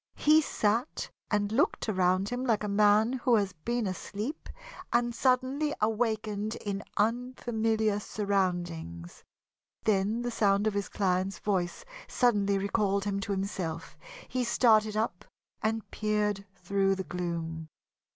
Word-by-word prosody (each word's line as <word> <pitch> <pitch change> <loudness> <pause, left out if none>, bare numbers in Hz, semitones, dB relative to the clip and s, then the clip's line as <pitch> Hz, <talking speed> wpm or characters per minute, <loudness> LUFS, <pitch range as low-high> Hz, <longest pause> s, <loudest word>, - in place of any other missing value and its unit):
He 310 +1 +5
sat 230 -1 -1 0.2
and 205 -1 +1
looked 245 +2 +1
around 185 -1 +2
him 245 +1 -3
like 225 -5 +1
a - - -1
man 210 +3 +4
who 250 -2 +2
has 200 -3 +1
been 235 +8 -2
asleep 210 - -5 0.4
and 240 0 +2
suddenly 260 +4 +1
awakened 215 -1 0
in 200 -1 -4 0.2
unfamiliar 225 -2 0
surroundings. 175 - -2 0.6
Then 215 +3 +1
the 245 - -2
sound 200 -2 +2
of 215 - +1
his 200 -1 -2
client's 190 0 0
voice 185 -4 -2 0.2
suddenly 205 -5 +2
recalled 200 0 0
him 200 -1 -1
to 200 - -4
himself. 190 -5 -3 0.3
He 255 0 -1
started 220 -3 +3
up 215 -5 -1 0.4
and 220 0 -1
peered 210 -2 0
through 195 +1 +1
the 190 - -3
gloom. 165 -2 -4
210 Hz, 130 wpm, -29 LUFS, 195-230 Hz, 0.6 s, He